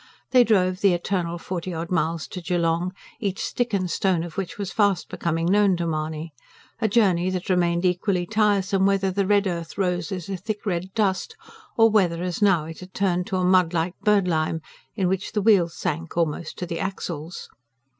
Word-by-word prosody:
They 250 -1 +7
drove 185 -5 +2
the 195 -3 +4
eternal 175 -1 -2
forty 180 0 -5
odd 165 +2 -5
miles 165 -2 0
to 180 - -6
Geelong, 170 +1 0 0.3
each 195 -3 -2
stick 245 -1 -1
and 190 -3 0
stone 180 -1 +1
of 170 -2 -8
which 195 -3 -4
was 200 -2 -4
fast 205 -4 +1
becoming 165 0 -1
known 195 0 +3
to 170 - -2
Mahony; 155 0 -3 0.5
a 220 - +2
journey 190 -5 +3
that 185 0 -2
remained 175 0 +2
equally 180 0 +1
tiresome 200 -2 +2
whether 195 -1 +1
the 195 0 0
red 205 0 +3
earth 170 -3 -4
rose 180 -2 -1
as 180 -4 -4
a 195 -1 -3
thick 210 +3 -5
red 185 -1 -2
dust, 210 - 0 0.4
or 225 -1 +7
whether 180 -5 +2
as 180 0 -3
now 190 -7 +4
it 160 0 -9
had 185 0 -12
turned 180 -2 0
to 190 - -1
a 185 - +1
mud 180 -2 +3
like 170 +2 0
birdlime 180 -6 +2 0.3
in 195 -4 +1
which 190 +1 -2
the 210 - +1
wheels 190 -6 +4
sank 165 -1 -3
almost 165 -1 -1
to 180 - -3
the 170 -1 -4
axles. 170 -4 -5
180 Hz, 195 wpm, -24 LUFS, 170-195 Hz, 0.5 s, They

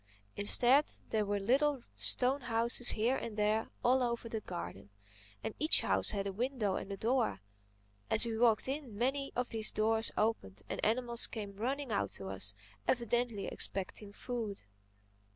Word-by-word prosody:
Instead 245 +7 +5 0.2
there 215 -2 -1
were 205 0 -1
little 270 +5 +1
stone 265 +3 +1
houses 235 0 +3
here 235 +5 +1
and 225 -5 -6
there 215 +1 +1 0.2
all 255 +2 +3
over 235 -1 -2
the 225 -1 -4
garden; 95 - -8 0.5
and - - -4
each 310 +2 +4
house - - +1
had 200 -2 -2
a 195 - -4
window 230 -3 -2
and 195 - -6
a 195 - -5
door. 230 - 0 0.7
As 220 - +7
we 230 -1 -3
walked 225 0 +2
in, 265 -6 -5
many 270 +4 -1
of 250 0 -2
these 220 -2 +2
doors 220 +1 +1
opened 100 - -2
and - - -5
animals 235 +1 +3
came 205 -3 -7
running 260 +5 -3
out 205 - -1
to 95 -1 -5
us 95 +1 -2 0.3
evidently 235 -3 -1
expecting 200 +2 -1
food. 220 -2 -5
225 Hz, 160 wpm, -33 LUFS, 205-250 Hz, 0.7 s, As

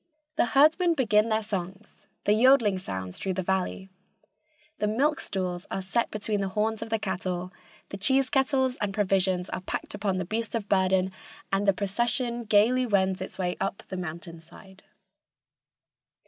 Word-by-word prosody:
The - - +3
herdsmen 325 +4 +5
begin 220 -4 +3
their 220 0 +1
songs, 195 -1 -6 0.2
the 205 - +3
yodling 225 -4 +4
sounds 95 - -5
through 190 -1 -2
the 190 - -2
valley, 190 +1 -2 0.9
the 210 - +1
milk 285 +9 +1
stools 180 -2 -3
are 190 - -3
set 230 +5 0
between 210 -1 -2
the 195 - -1
horns 215 +3 -1
of 225 - -5
the 225 - +1
cattle, 185 -2 -3 0.4
the 200 - -6
cheese 265 +7 +3
kettles 265 -1 +1
and 200 -2 -3
provisions 190 -3 +1
are - - -3
packed 290 +10 -5
upon 200 -2 -1
the 185 - -2
beasts 225 +5 -2
of 215 -3 -3
burden, 190 -1 +2 0.4
and 200 +1 +1
the - - +7
procession 235 +5 -1
gaily 225 +5 +3
wends 190 -3 +1
its 190 - -6
way 180 -1 -1
up 195 0 -2
the 190 - -4
mountainside. 170 +2 -9
200 Hz, 160 wpm, -27 LUFS, 185-230 Hz, 0.9 s, the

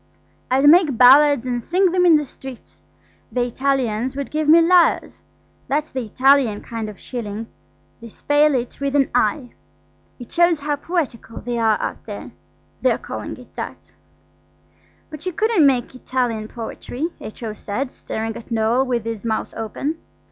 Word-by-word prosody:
I'd 270 +3 +3
make 310 -5 +6
ballads 270 +1 +6
and 245 -1 -2
sing 365 +6 +2
them 360 0 +3
in 330 - +7
the 300 - -2
streets. 265 -1 -12 0.5
The 245 -1 0
Italians 255 -1 -1
would 280 -1 -5
give 305 0 -1
me 325 +2 +8
lyres–that's 330 -3 0
the 260 -1 -3
Italian 255 -2 +3
kind 225 -2 -5
of 210 - -11
shilling, 225 -3 -5 0.6
they 230 - -9
spell 290 +5 +2
it 245 -1 -3
with 280 0 -2
an 275 -2 +2
i. 245 +2 0 0.7
It 245 -3 -11
shows 345 -3 +3
how 295 0 -1
poetical 290 -8 -3
they 240 0 -3
are 220 -2 +2
out - - -4
there, - - -7 0.5
their - - +2
calling - - -7
it - - -16
that." - - -7 1.2
"But 305 +3 -8
you 365 - -2
couldn't 415 -5 +3
make 255 -3 0
Italian 245 -4 -2
poetry," 245 +6 -5
H.O. 215 0 -6
said, 245 +6 -4
staring 225 0 -5
at 235 - -10
Noël 230 +2 +2
with 240 -3 -1
his 225 -2 -4
mouth 220 -2 -2
open. 275 +8 -4
260 Hz, 155 wpm, -21 LUFS, 230-300 Hz, 1.2 s, me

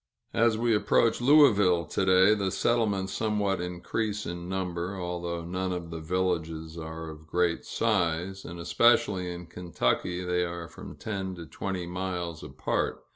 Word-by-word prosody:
As 115 -1 +3
we 115 0 +2
approach 115 +2 +3
Louisville 105 - +5
to 95 - -1
day, 95 +2 +6
the 100 -3 0
settlements 100 -3 +1
somewhat 105 -4 0
increase 105 +4 -3
in 85 +1 -5
number, 95 0 -3
although 85 -1 -3
none 95 +2 -2
of 85 -2 -4
the 80 - -5
villages 80 -2 -2
are 80 0 -6
of 80 0 -13
great 85 0 0
size; 95 -3 0
and, 85 0 -8
especially 95 -1 +3
in 90 0 -7
Kentucky, 90 +1 -1
they 90 0 +1
are 85 -1 -4
from - - -10
ten 95 -3 -4
to 85 -1 -8
twenty 95 +1 -4
miles 90 -2 -4
apart. - - -2
90 Hz, 150 wpm, -28 LUFS, 85-100 Hz, -, day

